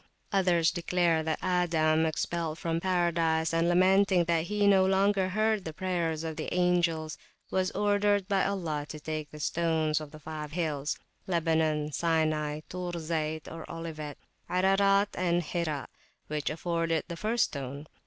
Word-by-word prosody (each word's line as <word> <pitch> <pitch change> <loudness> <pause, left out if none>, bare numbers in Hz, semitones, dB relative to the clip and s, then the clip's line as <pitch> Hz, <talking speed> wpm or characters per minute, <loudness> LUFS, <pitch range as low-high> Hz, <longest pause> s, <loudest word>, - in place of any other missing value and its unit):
Others 180 -5 +3
declare 175 -2 +1
that 160 0 -1
Adam, 160 -3 +2
expelled 160 0 -2
from 165 0 -1
Paradise, 170 -3 +1
and 165 +1 +2
lamenting 185 +1 +4
that 170 -1 +1
he 210 +2 0
no 195 -2 +6
longer 190 0 +2
heard 215 +1 +1
the 160 - -6
prayers 170 -3 -1
of 160 -1 -4
the - - -4
angels, 170 -3 +1 0.3
was 185 0 +1
ordered 205 -1 +2
by 195 -2 +2
Allah 160 -7 -2
to 155 - -7
take 155 0 -4
the 150 - -11
stones 160 -1 0
of 155 0 -9
five 150 -1 -7
hills, 155 -4 -1 0.3
Lebanon, 160 -3 +1
Sinai, 155 -2 0
Tur 180 -1 -5
Zayt 160 -2 -2 0.2
(Olivet), 155 -3 -6 0.3
Ararat, 195 +2 +3
and 175 -1 +1
Hira, 155 -3 -2 0.4
which 150 -1 -2
afforded 165 0 -1
the 170 - -5
first 220 +6 +1
stone. 140 +1 -5
165 Hz, 145 wpm, -29 LUFS, 155-185 Hz, 0.4 s, no